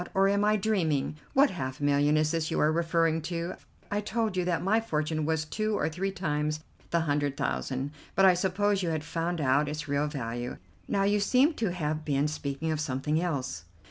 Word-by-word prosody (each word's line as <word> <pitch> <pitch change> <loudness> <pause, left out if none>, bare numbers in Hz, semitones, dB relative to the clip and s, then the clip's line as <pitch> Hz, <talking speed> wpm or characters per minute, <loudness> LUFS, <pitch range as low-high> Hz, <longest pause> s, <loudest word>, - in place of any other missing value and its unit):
Or 195 0 +5
am 200 +1 +2
I 210 +1 +4
dreaming? 175 -10 0 0.2
What 275 +1 +5
half 130 -7 -4
million 145 +1 +3
is 155 0 +2
this 165 -1 -1
you - - -1
are 155 - +4
referring 165 0 +1
to? 170 0 -3 0.4
I 205 0 0
told 220 -1 -1
you 180 - +1
that 175 -1 0
my 215 +4 +3
fortune 155 -6 -1
was 160 -1 0
two 215 +5 -1
or 150 - 0
three 185 +5 -2
times 155 -5 -2 0.3
the 170 - +2
hundred 145 -2 0
thousand, 135 +2 -2 0.2
but 195 - +5
I 185 - +8
supposed 195 +3 +1
you 175 - -1
had 155 -2 -1
found 165 +2 -2
out 140 +1 +2
its 155 0 -4
real 145 +1 +1
value. 120 -4 -4 0.3
Now 200 -1 +1
you 205 +1 +3
seem 255 +9 +4
to 220 -9 -1
have 155 -3 -2
been 145 -1 +1
speaking 150 +1 -3
of 155 - -1
something 150 +2 0
else." 130 - -3
160 Hz, 205 wpm, -29 LUFS, 150-190 Hz, 0.4 s, I